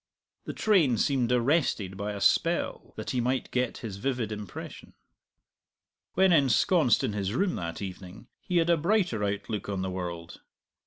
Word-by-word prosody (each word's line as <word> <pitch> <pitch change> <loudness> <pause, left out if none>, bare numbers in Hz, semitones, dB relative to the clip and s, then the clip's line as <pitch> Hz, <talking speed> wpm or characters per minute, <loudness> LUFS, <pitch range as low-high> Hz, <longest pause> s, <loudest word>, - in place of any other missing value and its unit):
The - - -5
train 170 - +3
seemed 125 0 +1
arrested 120 - +1
by 100 +2 -4
a 100 - -6
spell - - +1
that - - -5
he 125 - 0
might 125 +2 -1
get 125 -1 -1
his 100 -3 -5
vivid 120 -1 -2
impression. 105 -2 -8 1.2
When 190 0 +5
ensconced 145 - +3
in 105 - -1
his 100 +1 -2
room 190 +5 +1
that 85 +3 -5
evening 95 0 -8
he 180 - -2
had 170 0 +3
a 170 - +4
brighter 170 - +1
outlook 105 +1 -3
on 95 -2 -2
the 95 - -3
world. 85 -2 -6
115 Hz, 160 wpm, -28 LUFS, 100-150 Hz, 1.2 s, When